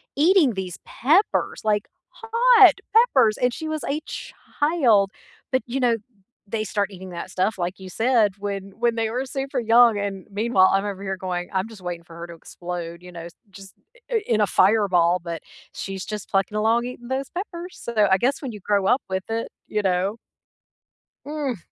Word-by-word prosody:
eating 315 - +4
these 185 -3 -5
peppers, 325 - +1
like 210 -1 +1 0.2
hot 450 -5 +5 0.2
peppers 260 - +5
and 250 -1 +1
she 315 - -5
was 310 -1 -3
a 295 +2 -1
child, 245 - 0 0.4
but, 260 - +2
you 260 +3 -2
know, 240 -3 +2 0.5
they 215 +1 -2
start 205 0 -1
eating 190 -1 -9
that 175 +1 -7
stuff, 190 +3 0
like 180 +1 -3
you 190 -1 -9
said, 225 0 +2
when 200 -1 -5
when 235 0 +2
they 225 -1 -1
were 250 +4 -2
super 270 0 -3
young. 230 -1 +5
And 200 -2 -4
meanwhile, 205 -2 +3
I'm 195 +1 +1
over 195 -1 -5
here 190 -1 -3
going, 180 -1 -4
"I'm 190 +2 -1
just 220 -4 -13
waiting 175 -1 -5
for 165 -1 -14
her 170 +1 -7
to 170 - -10
explode, 170 0 -7
you 180 0 -12
know, 170 -1 -8 0.2
just 195 0 -13 0.4
i 455 -3 +2
in 220 -2 +2
a - - +5
fireball." 185 -3 +3
But 170 -2 -5 0.3
she's 195 -1 -5
just 210 -2 -6
plucking 195 +1 0
along 225 +3 +2
eating 245 -1 -8
those 265 +1 -3
peppers. 355 -1 -6
So, 215 -3 +2
I 190 - +6
guess 270 +4 0
when 265 - -4
you 210 - -9
grow 200 0 +1
up 250 +7 +3
with 190 0 -2
it, 230 +1 -2 0.2
you 210 - -1
know? 190 +2 0 1.1
Mhm. 290 -5 -3
210 Hz, 190 wpm, -23 LUFS, 190-255 Hz, 1.1 s, I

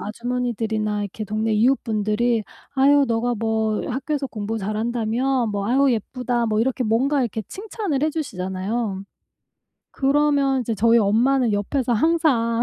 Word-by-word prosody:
아주머니들이나 220 -2 -2
이렇게 205 +2 -5
동네 215 +2 -1
이웃분들이 225 -1 +1 0.3
"아유 280 +1 +5
너가 235 +1 0
뭐 220 -1 -1
학교에서 275 +2 -2
공부 220 -1 -4
잘한다며? 230 +4 -1
뭐 200 -1 -2
아유 270 +1 +3
예쁘다." 240 +1 -2
뭐 215 -1 0
이렇게 255 +1 0
뭔가 265 +6 +1
이렇게 225 -3 -2
칭찬을 395 - -3
해 310 - +3
주시잖아요. 195 - -3 0.9
그러면 280 -1 +2
이제 230 -2 -2
저희 230 +2 +4
엄마는 230 +3 +2
옆에서 240 +4 0
항상 240 -5 +2
235 Hz, 340 characters per minute, -22 LUFS, 215-270 Hz, 0.9 s, 아유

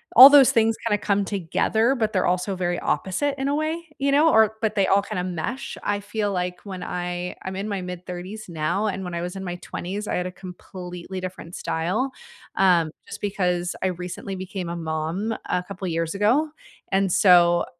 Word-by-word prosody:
All 260 +4 +13
those 285 -2 +7
things 225 0 +3
kinda 210 - +2
come 200 -1 +1
together, 220 +6 +1
but 220 -3 -1
they're 185 - +2
also 180 +2 0
very 175 -1 -1
opposite 275 +10 -1
in 270 - -1
a 285 - +1
way, 320 +2 -2
you 280 0 +2
know, 300 +3 +5
or 220 -1 +4
but 215 -1 0
they 195 - +3
all 195 +1 +4
kinda 180 - -3
mesh, 185 +9 -4
I 205 0 0
feel 205 0 -2
like 180 0 -2
when 185 -2 -6
I 180 0 -4
I'm 190 0 -5
in 200 +3 -3
my 200 -2 -2
mid 180 0 -7
30s 185 +4 -7
now, 170 +6 -1
and 190 -1 -3
when 180 - -5
I 170 - -2
was 180 +2 -5
in 190 - -5
my 175 -1 -4
20s, 195 +4 -5
I - - -1
had 180 - -1
a - - -6
completely 180 0 -8
different 180 -2 -7
style, 190 +12 -1 0.4
um, 175 -4 +4 0.2
just - - -8
because 180 -3 -1
I - - +3
recently 180 +2 -5
became 185 -1 -5
a 170 - -3
mom 165 +6 -2 0.2
a 180 - 0
couple 190 0 -6
years 165 +1 -2
ago, 250 +10 +3 0.4
and 195 -1 +2
so 175 -3 +5
190 Hz, 200 wpm, -24 LUFS, 180-215 Hz, 0.4 s, All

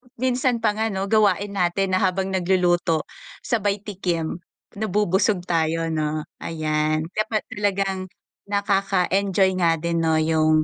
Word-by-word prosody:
Minsan 250 -1 0
pa 215 - +4
nga, 220 +1 +1
'no, 195 -2 -3
gawain 205 -1 +2
natin 185 +2 +1
na 185 - +2
habang 190 -1 0
nagluluto 175 -3 +1 0.4
sabay 205 -4 0
tikim, 180 -5 -3 0.4
nabubusog 205 -2 +1
tayo, 165 -1 0
'no, 155 -1 -1 0.2
ayan. 155 -1 -1
Kapa 215 +1 -1
talagang 195 -2 -1 0.4
nakaka-enjoy 195 -1 +1
nga 165 -2 +3
din, 170 +1 -2
'no, 160 -1 +2
yung, 155 0 +3
190 Hz, 125 wpm, -23 LUFS, 165-200 Hz, 0.4 s, pa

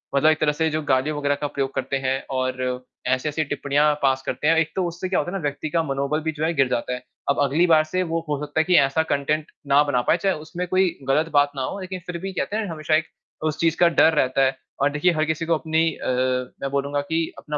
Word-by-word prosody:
मतलब 155 +3 +5
एक 155 - -1
तरह 150 -1 +3
से 160 +2 0
जो 155 0 -1
गाली 135 +1 +1
वग़ैरह 145 -1 0
का 145 - 0
प्रयोग 135 -1 -3
करते 135 - -2
हैं, 135 0 -1
और 130 -1 -2 0.2
ऐसी-ऐसी 150 +5 0
टिप्पणियाँ 145 +1 +1
पास 135 -1 +2
करते 130 +4 -2
हैं, 165 - +5
एक 160 -1 +1
तो 185 -2 0
उससे 175 +2 -5
क्या 190 - +2
होता 175 - -2
है 195 - -2
ना - - -6
व्यक्ति 145 +2 -3
का 165 +1 +1
मनोबल 140 +1 -1
भी 160 0 -1
जो 155 0 -5
है 170 - 0
गिर 135 -3 +3
जाता 125 +1 -1
है। 125 - -6 0.3
अब 140 - +2
अगली 155 +6 +2
बार 155 -2 +5
से 185 +4 -1
वो 165 -1 -1
हो 145 - -1
सकता 145 +2 -2
है - - +4
कि 180 - +3
ऐसा 160 +4 +1
कंटेंट 150 +2 0 0.2
ना 145 +1 +5
बना 140 -4 +1
पाए, 170 - +5
चाहे 195 +1 0
उसमें 160 +4 -5
कोई 185 +1 +3 0.2
ग़लत 155 +4 +2
बात 145 0 +4
ना 135 - -3
हो, 200 - -4
लेक़िन 185 0 -6
फ़िर 175 -1 -4
भी 195 0 -4
कहते 205 - -2
हैं 220 -1 -1
ना 175 - -5
हमेशा 155 0 0
एक 155 0 +1 0.4
उस 155 0 -2
चीज़ 165 -1 +2
का 175 - +6
डर 165 -1 +4
रहता 135 -2 +2
है। 130 0 0 0.3
और 140 - +4
देखिए, 150 +5 +2
हर 155 0 +1
किसी 160 +1 -2
को 165 - +2
अपनी 160 +1 +1
अ, - - -7 0.5
मैं 135 - -2
बोलूँगा 140 +1 -1
कि 160 +3 -1
अपना 150 -1 -4
155 Hz, 270 wpm, -23 LUFS, 140-165 Hz, 0.5 s, का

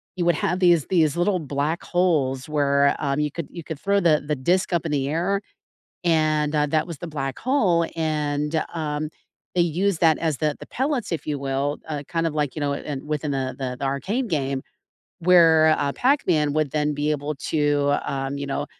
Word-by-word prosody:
you 180 - -1
would 175 -2 +3
have 175 +4 -1
these 175 -5 +4
these 165 -4 +2
little 185 +1 +2
black 145 +3 -2
holes 150 -8 +1
where, 140 -2 +2
um, 140 0 -1
you 150 -1 0
could 165 0 -5
you 170 - -8
could 160 -3 -6
throw 200 +3 +2
the 155 -5 +3
the 150 0 0
disk 180 +9 +1
up 170 -2 0
in 160 - -2
the 140 -1 0
air, 180 +6 0 0.6
and, 155 -2 +2
uh, 150 - +3
that 155 +1 +1
was 170 - -6
the 175 - -6
black 135 -4 -4
hole, 205 -11 +2
and, 150 -1 -1
um, 150 -1 -2 0.5
they 175 - +4
use 175 +3 +1
that 160 -2 +4
as 160 -4 0
the 150 0 0
the - - -10
pellets, 265 -4 -2
if 165 - -3
you 145 -2 -2
will, 140 +2 -1
uh, 145 -2 -3
kind 165 -1 0
of, 155 - -3
like, 145 -3 -1
you 155 - -4
know, 145 -1 0
in 140 -1 -5
within 150 -1 -2
the 130 -2 -2
the 125 -2 -4
the 140 - -2
Arcade 200 - -1
game, 135 -5 -1 0.6
where, 165 -3 +6
uh, 140 - 0
Pac-Man 180 - +2
would 155 -2 0
then 150 -1 0
be 145 +1 -1
able 150 0 -2
to, 145 +1 +1
um, 135 0 -3
you 140 - -4
know, 145 +1 -2
150 Hz, 205 wpm, -23 LUFS, 145-170 Hz, 0.6 s, where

